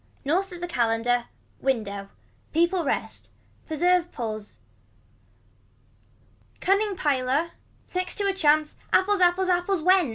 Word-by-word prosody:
North 365 +7 +1
of 350 -1 -9
the 350 - -3
calender. 235 -3 +1 0.3
Window. 200 -7 -2 0.4
Peoples 340 0 +2
rest. - - -3 0.4
Preserve 350 +2 +2
pulls. 215 -4 -6 2.0
Cunning 400 +1 +1
piler. 285 +2 0 0.4
Next 365 0 -2
to 405 - -1
a 395 - +2
chance. 310 -4 +2 0.2
Apples. 400 +1 +3
Apples. 360 +1 +3
Apples 355 -1 +1
went. 365 -4 +4
340 Hz, 110 wpm, -25 LUFS, 255-370 Hz, 2.0 s, went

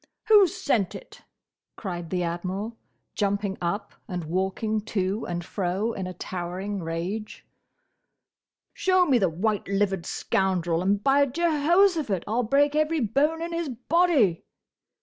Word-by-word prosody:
"Who 415 -3 +8
sent 230 - -1
it?" - - -11 0.5
cried 175 -5 -5
the 180 -1 -1
Admiral, 185 +6 -3 0.4
jumping 200 -1 -1
up 175 +4 -2
and 180 -2 -4
walking 190 +6 -1
to 195 0 -1
and 175 -1 -4
fro 195 +5 -1
in 190 -3 -4
a 185 - -6
towering 185 +3 -4
rage. 175 +6 -4 1.3
"Show 370 -3 +3
me 265 -7 +3
the 190 -4 +2
white 205 +5 -1
livered 195 -2 0
scoundrel, 175 -3 0
and 200 +2 +1
by 280 +1 +4
Jehoshaphat! 320 - +2
I - - -6
'll 235 +3 +2
break 285 +5 +2
every 310 +1 +2
bone 295 +8 +1
in 340 0 -4
his 335 -3 -2
body!" 255 - +2
205 Hz, 135 wpm, -26 LUFS, 185-285 Hz, 1.3 s, Who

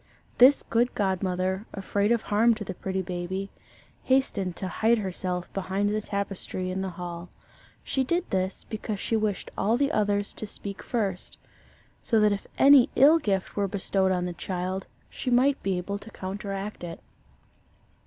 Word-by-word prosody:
This 265 +3 +7
good 240 +2 +1
godmother, 190 0 -1
afraid 200 +2 0
of 235 -2 +2
harm 225 +3 +3
to 215 - -6
the 190 - -5
pretty 190 +1 -3
baby, 185 +2 -4 0.5
hastened 215 -9 +1
to 190 - -4
hide 225 +5 +2
herself 180 -3 -3
behind 195 +1 -1
the 215 - 0
tapestry 195 -2 -3
in 190 +1 -2
the 190 - -2
hall. 175 0 -7 0.5
She 265 - 0
did 340 +7 0
this, 190 0 -1
because 215 -2 -5
she 225 - -1
wished 215 -3 -1
all 220 +4 +2
the 280 +2 +1
others 205 -3 +1
to 215 - -6
speak 200 -1 -7
first 200 -7 -3 0.6
so 225 - +2
that 210 -1 +4
if 200 -1 -3
any 275 -1 +7
ill 300 +5 +7
gift 195 - -1
were 200 -1 +1
bestowed 195 -1 0
on 180 -1 0
the 180 - -3
child, 185 +2 -3 0.2
she 255 - -5
might 260 +3 +3
be 190 -2 0
able 200 +3 -3
to 215 - -11
counteract 195 0 -5
it. 170 -1 -6
200 Hz, 165 wpm, -27 LUFS, 185-220 Hz, 0.6 s, This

